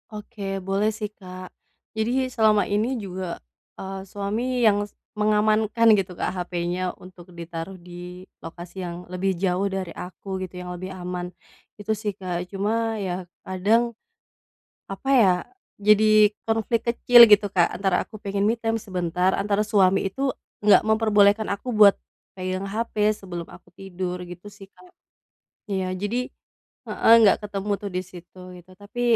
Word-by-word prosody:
Oke, 210 0 -10 0.3
boleh 200 +2 +1
sih, 215 -1 -4
Kak, 185 -2 -11 0.4
jadi 240 +4 0
selama 215 -2 +4
ini 220 +6 0
juga, 185 -2 -5 0.4
eee, 190 0 -6
suami 225 +6 -2
yang, 205 -1 +3
s - - -33 0.2
mengamankan 215 +2 +2
gitu, 185 -2 -4
Kak, - - -1
hapenya 175 +1 -3
untuk 180 -1 -14
ditaruh 170 +2 -7
di 180 0 -10 0.2
lokasi 175 +3 -9
yang 175 0 -6
lebih 190 +1 -1
jauh 185 +1 0
dari 190 -3 -4
aku, 190 +2 -7
gitu, 185 -1 -6
yang 180 - -7
lebih 185 +1 -7
aman, 180 -1 -5 0.5
Itu 205 - -3
sih, 210 0 -3
Kak. 180 -2 -4
Cuma 225 +3 -1
ya 185 -1 -3 0.2
kadang, 200 +5 +2 1.0
apa 195 +7 -6
ya, 190 -4 +5 0.5
jadi 215 0 +5 0.2
konflik 225 +1 0
kecil, 240 0 +8
gitu, 210 -1 +6
Kak, 175 -3 +4
antara 190 -1 +1
aku - - -14
pengen 200 0 -1
me 220 - +3
time 225 -1 -1
sebentar, 180 -2 -1
antara 205 0 0
suami 195 -3 +3
itu, 270 +8 -2 0.3
nggak 205 -1 +6
memperbolehkan 215 -1 +3
aku 200 +5 -9
buat 205 -2 +8 0.4
pegang 185 +1 -3
hape 220 0 -3
sebelum 180 -5 -7
aku - - -15
tidur, 185 -1 -5
gitu 175 +2 -10
sih, 195 - -13
Kak. - - -19 0.9
Ya 190 -1 -1
jadi 220 +7 -2 0.6
heeh, - - +2
nggak 205 - +6
ketemu 200 0 -4
tuh 205 - -4
di 180 - 0
situ, 175 0 -14 0.2
gitu. 175 +1 -17
Tapi, 205 +6 -8
195 Hz, 150 wpm, -24 LUFS, 180-215 Hz, 1.0 s, kecil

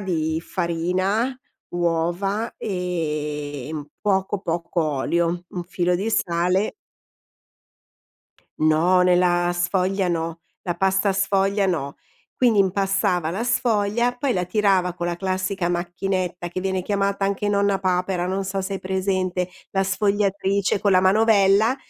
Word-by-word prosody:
di 160 -4 -1
farina, 185 +8 -1 0.4
uova 175 +6 -1
e 150 - -3
un 150 -2 -5
poco 195 0 0
poco 170 -1 -2
olio, 170 +4 0
un 175 -1 -5
filo 180 0 0
di 200 +5 -2
sale 180 +1 +1 1.8
No, 165 +4 +4
nella 175 -1 +3
sfoglia 185 +2 0
no, 165 -1 -2 0.2
la 175 -2 -2
pasta 190 +2 +2
sfoglia 195 +1 +1
no. 140 -6 -2 0.4
Quindi 240 -4 +3
impastava 190 -3 +1
la 210 +7 -2
sfoglia, 235 0 +1
poi 265 0 0
la 180 -1 0
tirava 190 -2 +2
con 175 -1 -3
la 175 0 -2
classica 185 0 -1
macchinetta 175 0 -2
che 180 +2 -4
viene 190 0 -1
chiamata 200 0 0
anche 200 +1 -1
nonna 200 -1 +2
papera, 180 -1 0
non 190 +1 -2
so 195 0 -2
se 195 +1 -3
hai - - -3
presente, 185 -1 -1 0.2
la 195 - +2
sfogliatrice 200 0 +1
con 205 - +2
la 185 -1 +5
manovella 205 +3 +4
185 Hz, 130 wpm, -23 LUFS, 175-200 Hz, 1.8 s, la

